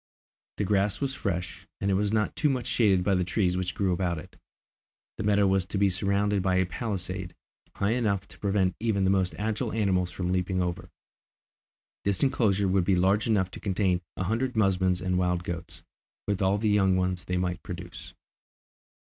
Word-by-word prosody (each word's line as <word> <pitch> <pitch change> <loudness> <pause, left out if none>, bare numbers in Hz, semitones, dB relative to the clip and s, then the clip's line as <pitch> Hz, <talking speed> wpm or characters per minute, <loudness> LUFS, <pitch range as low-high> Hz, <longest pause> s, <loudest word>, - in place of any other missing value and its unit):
The - - 0
grass 100 0 +1
was 140 -1 -1
fresh, 90 -4 -4
and 100 0 0
it - - +2
was 100 +1 +1
not 110 -1 0
too 150 - +2
much 130 -3 -1
shaded 100 -6 +3
by 100 - +2
the 90 -1 +2
trees 90 0 +1
which 90 -1 -2
grew 95 -2 +1
about 90 -1 -1
it. 90 +3 -10 0.8
This - - -2
meadow 105 -1 +4
was 95 -1 +2
to 100 - -3
be 100 -1 +3
surrounded 100 +2 +1
by 95 0 +1
a 95 0 +3
palisade, 90 -2 -4 0.4
high 100 +2 0
enough 105 -5 0
to - - -15
prevent 95 -2 +1
even 110 -3 +1
the 95 - +3
most 95 -2 +1
agile 105 0 -2
animals 95 -4 +1
from 90 0 -3
leaping 95 0 0
over. 90 -1 -2 1.1
This 100 +3 +1
enclosure 110 -7 +2
would 95 0 +2
be 95 +2 +2
large 95 +5 +2
enough 95 -5 +1
to - - -8
contain 95 -2 0 0.2
a - - -1
hundred 115 +6 -1
musmons 95 -3 +2
and 90 0 +1
wild 90 -1 0
goats, 85 -2 -5 0.4
with 100 -2 -1
all 95 +1 +3
the 110 +1 0
young 95 -2 +3
ones 90 -1 -1
they 90 - -1
might 90 -1 -2
produce. 90 0 -8
95 Hz, 190 wpm, -27 LUFS, 90-105 Hz, 1.1 s, meadow